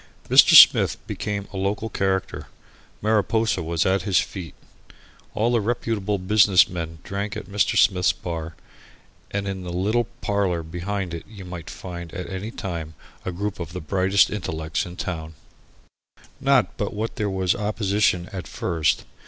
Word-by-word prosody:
Mr. - - +7
Smith - - +8
became 100 -2 -4
a - - -5
local 100 +3 -1
character. 95 -3 -2 0.6
Mariposa 110 -1 +1
was 80 -1 -1
at 95 +1 +2
his 95 -4 +2
feet. 90 -6 -5 0.8
All 110 +3 +1
the 120 -2 +2
reputable 105 -2 -1
business 95 0 +5
men 85 -2 -5
drank 100 +2 -4
at - - -7
Mr. 105 0 0
Smith's 90 -2 +4
bar, 80 -2 -6 0.7
and 100 0 -3
in 95 -1 -4
the 90 -1 -6
little 105 +7 +1 0.2
parlour 95 -5 0
behind 90 +2 -4
it 85 - -5
you 100 -3 -11
might 90 -2 -8
find 85 -2 -8
at 90 - -5
any 95 +3 -5
time 85 -8 -6 0.3
a 95 - -2
group 100 +2 -4
of 85 -1 -6
the 90 - -4
brightest 95 +4 +2
intellects 80 -5 -3
in 90 - -9
the - - -4
town. 80 -3 -5 1.0
Not 135 -7 +2
but 105 - -2
what 110 +2 -4
there 105 -2 -1
was 95 -2 +1
opposition 105 -4 0
at 95 -2 -6
first. 80 -4 0
95 Hz, 160 wpm, -23 LUFS, 85-105 Hz, 1.0 s, Smith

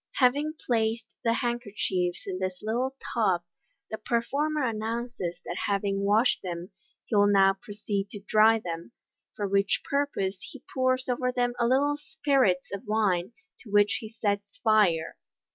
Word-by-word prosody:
Having 285 +4 +2
placed 230 -1 +1 0.2
the 230 - +3
handkerchiefs 205 -7 -1
in 185 -1 -4
this 185 -1 -3
little 245 +5 -1 0.2
tub, 190 -7 +2 0.5
the 220 - -4
performer 280 +7 0
announces 225 -5 -3
that 175 - -3
having 200 -1 0
washed 215 +5 +3
them, 175 0 -6 0.3
he 225 - -2
will 205 0 +6
now 195 -1 +5
proceed 205 -1 -3
to 205 - -8
dry 220 +1 +5
Ihem, 170 +2 -6 0.4
for 205 - -2
which 200 0 +1
purpose 240 -10 -1
he 275 -2 -11
pours 255 0 +1
over 250 0 0
them 245 -1 0
a 235 - +3
little 285 +3 +2
spirits 270 -10 +1
of 200 - -6
wine, 210 -2 +1 0.3
to 225 - -14
which 205 0 +4
he 220 - -8
sets 205 -2 -3
fiire. 195 - +3
215 Hz, 150 wpm, -28 LUFS, 195-245 Hz, 0.5 s, will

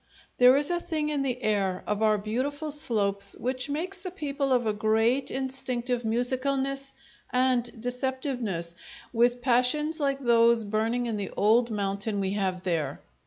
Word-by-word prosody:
There 250 +1 +7
is 290 +3 +1
a 345 - +1
thing 315 -3 -2
in 295 -2 0
the 255 -2 -2
air 195 -3 0
of 210 0 -2
our 215 -1 +4
beautiful 270 +9 -3
slopes 200 -8 +1
which 255 +2 -2
makes 350 +6 -3
the 370 - -6
people 285 -6 -3
of 245 -2 +2
a 215 - +1
great 225 +5 +1
instinctive 255 -2 -2
musicalness 270 +4 -1 0.4
and 250 -1 +2
deceptiveness, 245 - -2 0.4
with 240 +1 +2
passions 275 +6 +2
like 275 -2 0
those 235 -2 +4
burning 220 +4 -1
in 225 -3 -2
the 200 -2 -4
old 230 +3 +4
mountain 200 0 -2
we 190 -1 -1
have 190 -3 -2
there. 160 -6 -1
245 Hz, 155 wpm, -27 LUFS, 215-275 Hz, 0.4 s, There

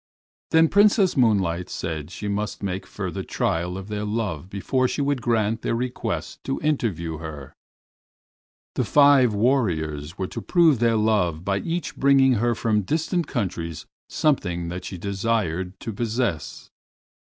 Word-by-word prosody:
Then 160 0 +5
Princess 200 0 +4
Moonlight 95 - +2
said 80 -4 -4
she 100 +3 -6
must 105 +1 -3
make 95 -1 -3
further - - -4
trial 90 +2 -1
of 95 0 -7
their 105 -1 -3
love 105 -6 -3
before 130 +6 0
she - - -3
would 140 -2 0
grant 115 -1 +1
their - - -1
request 125 +1 -4
to 135 - -2
interview 95 - -1
her. 75 -4 -8 1.2
The - - 0
five 140 -6 +5
warriors 85 - 0
were 95 - -2
to - - -6
prove 165 -8 +4
their 115 -1 +3
love 100 -7 +1
by 100 0 +1
each 170 +4 -3
bringing 135 -1 +5
her 120 -1 +2
from 110 -2 +1
distant 160 - -1
countries 85 - -3 0.2
something 90 - 0
that 90 +1 -6
she 95 - -6
desired 95 -2 -2
to 115 - -5
possess. 110 - -3
105 Hz, 145 wpm, -24 LUFS, 90-130 Hz, 1.2 s, Then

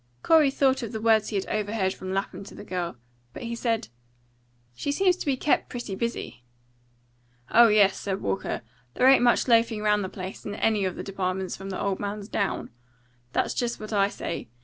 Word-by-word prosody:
Corey 315 -3 +5
thought 270 -1 +2
of 230 -1 -5
the 220 - -3
words 220 -1 +3
he 215 - -4
had 195 - 0
overheard 205 -2 -1
from 185 0 -7
Lapham 195 0 -3
to - - -11
the - - -9
girl. 175 -6 -4 0.4
But - - -8
he 235 0 -4
said, 230 - -1 0.8
"She 285 - -3
seems 365 +4 +3
to - - -6
be 270 -2 +2
kept 295 - +1
pretty 240 -5 -5
busy." 230 - -4 1.1
"Oh 235 +1 +8
yes," 205 -3 +4
said 195 -1 -3
Walker; 195 - -2 0.3
"there 255 - +4
ain't 270 -1 +7
much 245 +1 +3
loafing 230 -2 +3
round 210 -1 +3
the 190 - -4
place, 185 0 -7
in 205 - -5
any 215 -2 +1
of 185 - -2
the - - -5
departments, 190 -1 -2
from 195 0 -8
the 190 - -4
old 195 -1 -1
man's 205 +1 -5
down. 200 - -2 0.6
That's - - +1
just 240 -1 -2
what 215 0 -6
I 200 -1 +4
say. 170 - -5
210 Hz, 200 wpm, -26 LUFS, 195-235 Hz, 1.1 s, Oh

